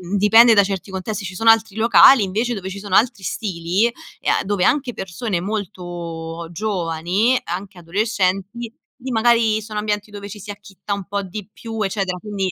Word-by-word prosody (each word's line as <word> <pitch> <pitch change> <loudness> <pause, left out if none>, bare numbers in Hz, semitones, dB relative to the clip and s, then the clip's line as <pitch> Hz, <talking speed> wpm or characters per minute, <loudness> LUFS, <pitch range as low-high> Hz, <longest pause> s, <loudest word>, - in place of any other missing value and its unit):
dipende 225 +4 +7
da 205 -2 +6
certi 195 0 -4
contesti, 200 +2 -4
ci 190 - -6
sono 225 +5 +2
altri 220 -2 +4
locali 230 +3 +7
invece 215 +5 -1
dove 190 -4 -5
ci 190 - -7
sono 200 -2 -7
altri 210 -3 +2
stili, 180 +1 -1
e 240 - -7
a - - +2
dove 200 -2 0
anche 260 -3 +1
persone 190 0 -3
molto 175 -5 -5
giovani, 185 +4 0
anche 185 +2 -6
adolescenti, 195 +4 -1 0.3
lì 260 +1 -5
magari 225 -1 +3
sono 215 -1 -5
ambienti 210 0 -2
dove 205 0 -8
ci 210 +1 -9
si 205 +1 -7
acchitta 205 0 -7
un 200 -2 -5
po' 200 0 -2
di 190 +2 -7
più, 225 0 -6
eccetera, 195 -2 -1
quindi 195 -2 -3
205 Hz, 175 wpm, -20 LUFS, 185-220 Hz, 0.3 s, dipende